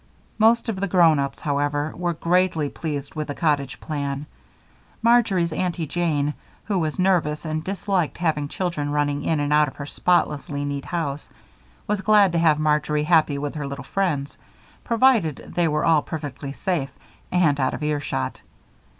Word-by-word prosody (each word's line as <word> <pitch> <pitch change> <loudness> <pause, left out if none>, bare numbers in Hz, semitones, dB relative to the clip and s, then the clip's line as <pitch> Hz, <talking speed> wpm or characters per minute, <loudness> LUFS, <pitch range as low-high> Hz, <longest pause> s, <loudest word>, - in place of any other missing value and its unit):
Most 230 +3 +4
of 215 -4 -2
the 200 - 0
grown 170 -5 +5
ups, 140 0 -3
however, 145 +1 -1
were 175 -1 -2
greatly 170 -3 +1
pleased 145 -3 -5
with 155 -1 -4
the 145 - -4
cottage 145 -5 0
plan. 140 -1 -4 0.8
Marjory's 210 -8 +3
Aunty 175 -1 -1
Jane, 150 -3 0 0.3
who 200 -3 -1
was 155 -2 -2
nervous 175 -5 +1
and 155 0 -2
disliked 190 -2 -1
having 155 -4 0
children 150 -3 -2
running 145 -1 0
in 160 -2 +1
and 145 0 0
out 150 0 +5
of 135 - -8
her 145 - -6
spotlessly 145 -3 0
neat 140 -1 -4
house, 150 -5 -3 0.6
was 210 -1 -1
glad 205 -2 +5
to 170 - +1
have 160 -3 +4
Marjory 150 0 +1
happy 155 -3 +3
with 145 0 -3
her 145 -2 -4
little 140 -2 -6
friends, 145 -4 -2 0.4
provided 230 - +3
they 175 -1 0
were 150 -1 0
all 160 -2 +4
perfectly 145 -3 -6
safe 165 -5 -2 0.4
and 160 -6 +3
out 130 -1 +1
of - - -6
earshot. 150 -1 -2
155 Hz, 165 wpm, -23 LUFS, 145-180 Hz, 0.8 s, grown